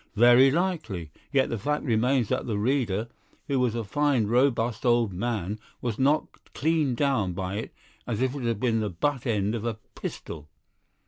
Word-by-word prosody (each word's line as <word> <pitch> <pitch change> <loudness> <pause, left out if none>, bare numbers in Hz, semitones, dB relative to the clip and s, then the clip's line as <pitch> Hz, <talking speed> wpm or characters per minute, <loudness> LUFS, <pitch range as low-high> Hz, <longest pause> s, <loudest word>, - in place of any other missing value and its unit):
"Very 120 +4 +7
likely. 135 - -2 0.2
Yet 135 -3 +2
the 115 - -2
fact 150 +7 -1
remains 125 -1 +2
that 130 0 -1
the 110 -3 -1
reader, 115 -2 0 0.4
who 140 -2 0
was 125 -3 +1
a 115 - -2
fine, 135 +2 +1
robust 120 -1 +1
old 120 -5 +3
man, 105 0 -2 0.2
was 120 -4 -3
knocked 145 +4 0
clean 155 -4 +1
down 115 -9 +1
by 95 +2 -3
it 110 - -5 0.3
as 110 -3 -2
if 130 0 +1
it 145 - -5
had 115 -3 -1
been 115 -2 +1
the 105 -1 -1
butt 130 - -1
end 105 -2 +1
of 115 -2 -3
a 115 -2 -2 0.2
pistol." 75 -2 -7
120 Hz, 180 wpm, -27 LUFS, 105-135 Hz, 0.4 s, Very